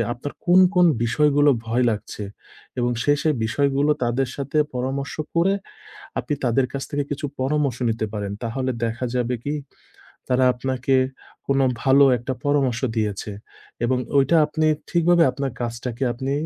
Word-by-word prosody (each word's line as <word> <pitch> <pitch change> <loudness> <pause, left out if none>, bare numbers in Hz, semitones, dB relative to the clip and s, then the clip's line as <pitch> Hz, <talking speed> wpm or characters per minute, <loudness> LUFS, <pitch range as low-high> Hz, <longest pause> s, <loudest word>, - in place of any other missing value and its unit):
আপনার 125 +4 -6
কোন, 180 +2 +6
কোন 180 -1 +6 0.2
বিষয়গুলো 145 +4 +3 0.2
ভয় 120 +2 +1
লাগছে, 105 -1 -5 0.5
এবং 120 0 +1
সেই, 145 0 +3
সেই 155 -2 +2
বিষয়গুলো 140 +5 +1
তাদের 120 +2 0
সাথে 140 +2 -2 0.2
পরামর্শ 135 +2 -3 0.2
করে, 185 +4 +3 0.7
আপনি 150 - -3
তাদের 125 +2 +2
কাছ 135 - -3
থেকে 145 0 0
কিছু 145 +1 -3 0.2
পরামর্শ 140 -2 0
নিতে 110 -1 -1
পারেন। 100 -2 -3
তাহলে 130 +3 -2
দেখা 120 +2 -3
যাবে 125 0 0
কি? 145 - -2 0.8
তারা 130 +1 +3
আপনাকে 130 +1 -2 0.5
কোন 140 0 +2 0.2
ভালো 135 +1 +6
একটা 120 +3 -4
পরামর্শ 135 -5 +1 0.2
দিয়েছে, 105 -1 -2 0.5
এবং 130 +1 +1 0.2
ওইটা 140 +5 +4
আপনি 155 +1 0 0.2
ঠিকভাবে 170 0 +4
আপনার 135 +1 -3
কাজটাকে 120 +2 -4
আপনি 130 +4 -4
135 Hz, 145 wpm, -23 LUFS, 120-145 Hz, 0.8 s, কোন